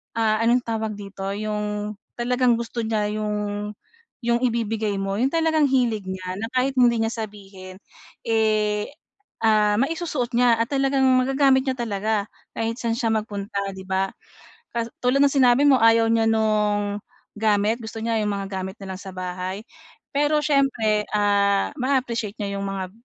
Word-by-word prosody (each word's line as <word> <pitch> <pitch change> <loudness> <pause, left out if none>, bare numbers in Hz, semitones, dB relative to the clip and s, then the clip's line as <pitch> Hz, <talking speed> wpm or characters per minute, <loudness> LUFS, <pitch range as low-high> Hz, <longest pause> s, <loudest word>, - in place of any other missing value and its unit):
ah, 220 -1 +2
anong 240 +2 +3
tawag 220 -2 -3
dito? 195 -1 -7
'Yong 210 0 -3 0.2
talagang 245 0 +2
gusto 235 +1 -4
niya 220 -2 0
'yong 210 -1 -3 0.5
'yong 235 0 +2
ibibigay 225 -3 0
mo 195 0 -2
'yong 260 +3 +2
talagang 320 -2 +2
hilig 245 -6 +1
niya, 185 -1 -5
na 225 - -3
kahit 260 +1 +1
hindi 235 -2 +4
niya 225 - -1 0.2
sabihin, 195 -2 -12 0.4
eh, 215 -1 +1 0.5
ah 210 -2 +4
maisusuot 285 -2 -1
niya 240 0 +4
at 230 +3 -1
talagang 270 -1 +2 0.2
magagamit 270 0 +3
niya 260 - 0
talaga 215 -2 -1 0.3
kahit 230 +1 -2
saan 230 -1 -1
siya 230 -2 0
magpunta, 205 -2 -3 0.2
'di 190 - -9
ba? 190 0 +1 0.7
Ka 230 -1 -1 0.2
tulad 250 +2 +3
ng 285 - +7
sinabi 260 -1 +4
mo, 270 -2 +6
ayaw 225 0 +5
niya 225 0 +2
nung, 210 -2 +1 0.3
gamit 215 +1 +1
gusto 225 -1 -7
niya 225 -1 0
yung - - -1
mga 200 -1 -3
gamit 190 +1 -5
na 190 -1 -6
lang 185 - -10
sa 195 - -8
bahay. 185 +2 -4 0.5
Pero 295 +2 +2
siyempre, 245 -8 +2
ah, 200 -1 +2
maa-appreciate 245 -5 -1
niya 200 -1 -3
'yung 200 - -3
mga 190 -2 -4
220 Hz, 160 wpm, -23 LUFS, 205-245 Hz, 0.7 s, ng